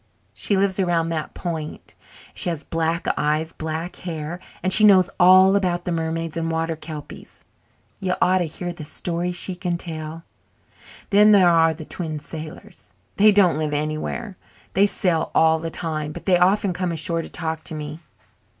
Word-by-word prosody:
She 200 - 0
lives 195 0 +1
around 170 -3 +1
that 160 -2 -4
point 160 -3 -6 0.4
and - - -30
she - - 0
has 160 -3 -4
black 165 +1 -1
eyes 155 +2 0
and - - -24
black 160 +2 -4
hair 165 -1 -5 0.2
and 185 +1 +5
she 215 - +5
knows 195 -3 +6
all 185 +2 +7
about 180 -3 0
the 180 - -2
mermaids 165 0 -2
and 165 0 -2
water 165 0 -1
kelpies. 155 -2 -10 0.6
You 185 -1 -1
ought 185 +1 +3
to 175 - 0
hear 175 +3 -5
the 170 -3 -9
stories 175 +3 -3
she 185 +1 -4
can 180 -1 -2
tell. 160 -1 -7 0.9
Then 210 +1 +6
there 190 -3 +6
are 165 -1 +4
the 155 0 -9
Twin 160 -2 -5
Sailors. 155 - -9 0.3
They 210 +1 +7
don't 185 -7 +4
live 150 -1 -1
anywhere 155 +8 -3 0.4
they 200 +2 +4
sail 180 -4 0
all 160 0 +4
the 165 +1 -4
time, 155 -2 -3
but - - -9
they 185 - +4
often 190 +1 +3
come 180 -1 -2
ashore 165 +1 0
to - - -9
talk 160 -2 -4
to 160 - -4
me. 150 +1 -6
165 Hz, 180 wpm, -22 LUFS, 160-185 Hz, 0.9 s, all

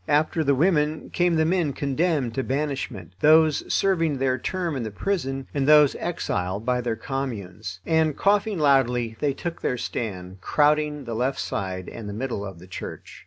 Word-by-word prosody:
After 155 +2 +2
the 140 -1 +3
women 155 0 +1
came 175 -1 +2
the 160 0 +3
men 165 -4 +1
condemned 140 -3 0
to 135 - -1
banishment, 135 - -3
those 155 0 +4
serving 165 -7 +2
their 130 -1 0
term 175 +1 -2
in 130 - -2
the 110 - -3
prison, 135 - -2
and 140 -1 0
those 150 -2 +7
exiled 100 - -2
by 125 0 +1
their 120 -2 -1
Communes; 110 -7 -5
and, 160 -2 +2
coughing 205 0 +2
loudly, 125 -6 +2
they 145 -2 +1
took 170 +1 -5
their 125 - 0
stand, 95 -6 -5
crowding 150 +4 +2
the 120 -2 -5
left 125 +4 -1
side 95 -2 -3
and 110 -3 -7
the - - -5
middle 115 -2 -3
of 95 -3 -7
the 85 - -13
church. 95 - -8
135 Hz, 175 wpm, -25 LUFS, 115-155 Hz, -, those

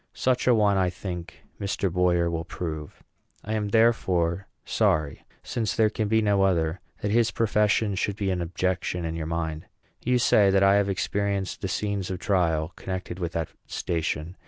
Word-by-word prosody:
Such 130 -1 +1
a 125 - +6
one 105 -2 +3
I 95 -1 +2
think 90 -1 -7 0.2
Mr. 100 -2 -1
Boyer 90 -1 +2
will 85 -1 -2
prove. 80 -4 -6 0.4
I 110 - -3
am, 105 -1 -1
therefore, 95 -5 +2 0.2
sorry, 75 -2 0 0.2
since 115 -4 -2
there 110 -1 +3
can 110 -2 -1
be 110 +1 +2
no 100 -2 +3
other, 85 -3 +1 0.2
that 105 - 0
his 115 0 +3
profession 105 -1 +2
should 95 +1 -1
be 100 -2 -1
an 90 -1 -1
objection 90 0 -2
in 80 - -2
your 80 -1 -4
mind. 80 -1 -3 0.4
You 125 +1 +2
say 105 -4 +4
that 95 0 +4
I 100 +1 +6
have 100 -1 +1
experienced 100 0 -1
the 95 - -2
scenes 100 0 -2
of 95 - -3
trial 85 -5 0
connected 95 -1 -5
with 85 -2 -3
that 80 -1 -2 0.2
station. 80 +1 -3
95 Hz, 180 wpm, -26 LUFS, 85-105 Hz, 0.4 s, a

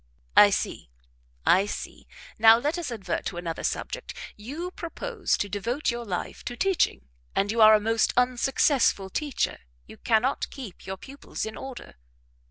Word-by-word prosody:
"I - - +9
see, - - -2 0.6
I 195 +3 +5
see - - -7 0.3
now 225 +1 +8
let 295 +8 -1
us 325 -7 -4
advert 195 -6 -3
to - - -5
another 170 -2 -4
subject; - - -3 0.2
you 295 +12 -6
propose 400 +5 -2
to 205 - -1
devote 230 +9 -1
your 235 0 -5
life 180 -4 -4
to 245 - -4
teaching, 370 - +1 0.3
and 200 +1 +1
you 230 0 +1
are 215 0 +9
a - - +3
most 225 +1 +2
unsuccessful 250 -4 +2
teacher; 295 +2 -1 0.3
you 110 - -13
cannot 240 +4 +1
keep 240 -11 -10
your 190 0 -4
pupils 275 +7 -7
in 220 - -6
order." 265 - -9
235 Hz, 160 wpm, -26 LUFS, 205-275 Hz, 0.6 s, I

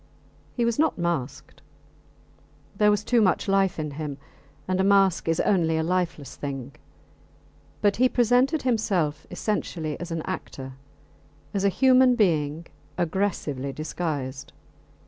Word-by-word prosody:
He 240 - +1
was 235 +2 0
not 315 0 +2
masked 170 -7 -3 1.1
there 210 -2 +4
was 210 0 +1
too 240 0 +3
much 190 -1 +2
life 195 -1 +2
in 150 -2 -3
him, 145 -1 -5 0.5
and 185 0 +1
a - - +2
mask 195 -3 +3
is 165 0 +1
only 165 -5 +2
a 160 - 0
lifeless 170 -4 -2
thing; 135 -2 -5 1.1
but 205 -1 +3
he 255 +2 +4
presented 250 +6 +2
himself 195 - 0
essentially 175 -5 -3
as 175 - -6
an 165 -1 -3
actor, 130 -1 -6 0.8
as 200 -1 -1
a 200 - +4
human 255 +3 +5
being 160 -7 +1 0.3
aggressively 160 -6 -1
disguised. 140 -2 -4
180 Hz, 130 wpm, -25 LUFS, 150-210 Hz, 1.1 s, human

